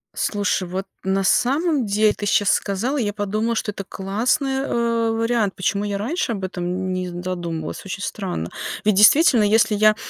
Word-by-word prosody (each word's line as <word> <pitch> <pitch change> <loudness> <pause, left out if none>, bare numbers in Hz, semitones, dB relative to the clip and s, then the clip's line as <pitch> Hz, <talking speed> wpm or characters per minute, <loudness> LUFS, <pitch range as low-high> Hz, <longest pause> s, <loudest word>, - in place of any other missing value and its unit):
Слушай, 205 -3 -1
вот 190 +2 -4 0.2
на 190 0 0
самом 275 - +2
деле 210 +1 +2
ты 205 - -6
щас 205 -1 +2
сказал, 225 +9 -1
и 250 - 0
я 205 -1 -2
подумала, 215 +3 -1
что 215 - -2
это 200 - -7
классный, 250 +8 -1
э, 230 -3 0
вариант. 225 -3 0
Почему 200 +2 -1
я 200 -1 -2
раньше 275 - -2
об 200 -4 -4
этом 185 -1 -4
н 185 +1 -2
не 185 0 -3
задумывалась, 175 -2 -5
очень 195 +1 -5
странно. 185 - -4 0.3
Ведь 215 -1 +3
действительно, 240 - +6
если 215 +1 +3
я, 215 +1 +4
205 Hz, 180 wpm, -21 LUFS, 190-230 Hz, 0.3 s, действительно